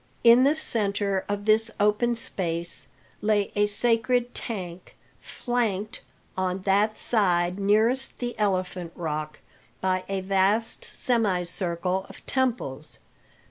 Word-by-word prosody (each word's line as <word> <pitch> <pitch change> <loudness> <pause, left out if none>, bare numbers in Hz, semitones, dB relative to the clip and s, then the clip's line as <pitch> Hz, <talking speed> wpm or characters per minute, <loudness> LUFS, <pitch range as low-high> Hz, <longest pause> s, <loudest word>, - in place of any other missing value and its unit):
In 235 +2 +7
the 290 +2 +3
centre 200 -8 0
of 205 0 -3
this 220 +1 +4
open 210 +4 +2
space 170 -6 0 0.3
lay 210 -1 +1
a 205 0 +3
sacred 235 +3 +1
tank, 185 -6 -6 0.2
flanked, 230 -2 -3 0.3
on 185 0 -2
that 205 +3 +2
side 180 -4 +2
nearest 220 +6 +1
the 240 -1 -4
Elephant 185 -4 -1
Rock, 155 -3 -4 0.4
by 185 0 0
a 195 -1 -1
vast 195 +4 +1
semicircle 185 -4 -1
of - - -14
temples. 230 - -2
205 Hz, 110 wpm, -26 LUFS, 185-230 Hz, 0.4 s, In